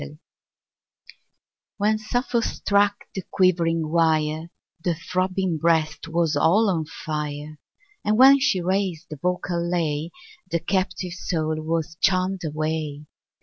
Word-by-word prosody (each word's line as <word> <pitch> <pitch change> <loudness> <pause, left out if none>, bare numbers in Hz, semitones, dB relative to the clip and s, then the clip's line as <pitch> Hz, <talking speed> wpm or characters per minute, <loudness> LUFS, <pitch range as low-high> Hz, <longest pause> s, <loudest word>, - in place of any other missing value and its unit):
1 70 +2 -9 1.6
When 215 +2 +2
Sappho 240 +2 0
struck 205 -2 +1
the 190 - -3
quivering 165 -4 +2
wire, 160 -1 +1 0.3
The 175 -2 +1
throbbing 185 0 -1
breast 160 -1 +1
was 165 -1 +1
all 195 +8 +4
on 160 -3 -1
fire; 150 -1 -5 0.4
And 215 +1 +1
when 270 +2 +8
she 195 -9 +2
raised 185 -2 -1
the 155 - -6
vocal 180 -1 -1
lay, 165 -3 -1 0.4
The 170 -1 0
captive 185 0 -2
soul 160 -3 -2
was 160 0 -2
charm'd 190 -1 +2
away! 155 -1 -3
170 Hz, 120 wpm, -24 LUFS, 155-190 Hz, 1.6 s, when